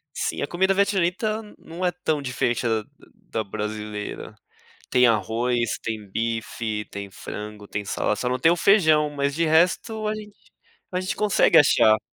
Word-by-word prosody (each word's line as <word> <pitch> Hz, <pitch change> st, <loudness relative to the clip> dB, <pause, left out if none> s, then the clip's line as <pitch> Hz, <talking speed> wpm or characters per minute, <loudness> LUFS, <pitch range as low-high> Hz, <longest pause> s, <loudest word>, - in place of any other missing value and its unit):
Sim, -, -, -2 dB
a -, -, -1 dB
comida 190 Hz, +4 st, +2 dB
vietnamita 200 Hz, +2 st, +1 dB, 0.2 s
não 170 Hz, +3 st, -6 dB
é 180 Hz, -, +2 dB
tão 160 Hz, -4 st, -2 dB
diferente 125 Hz, -2 st, -1 dB
da 110 Hz, -1 st, 0 dB, 0.5 s
da 110 Hz, -, -1 dB
brasileira. 105 Hz, 0 st, -5 dB, 0.6 s
Tem 125 Hz, -1 st, +5 dB
arroz, 115 Hz, +1 st, 0 dB
tem 110 Hz, -3 st, -5 dB
bife, 115 Hz, 0 st, -3 dB
tem 100 Hz, 0 st, -6 dB
frango, 105 Hz, +1 st, -8 dB
tem 105 Hz, -, -4 dB
salada, 105 Hz, -, -1 dB
só 125 Hz, -, -2 dB
não 125 Hz, +1 st, -1 dB
tem 165 Hz, +6 st, +4 dB
o 175 Hz, -, +3 dB
feijão, 155 Hz, -7 st, +4 dB
mas 140 Hz, -1 st, -1 dB
de 165 Hz, +2 st, +1 dB
resto 180 Hz, +7 st, +2 dB
a 215 Hz, -, -1 dB
gente 210 Hz, -1 st, -9 dB, 0.6 s
a 180 Hz, -, -1 dB
gente 185 Hz, -, -3 dB
consegue 205 Hz, -5 st, +3 dB
achar. 110 Hz, -7 st, +5 dB
135 Hz, 165 wpm, -24 LUFS, 110-180 Hz, 0.6 s, Tem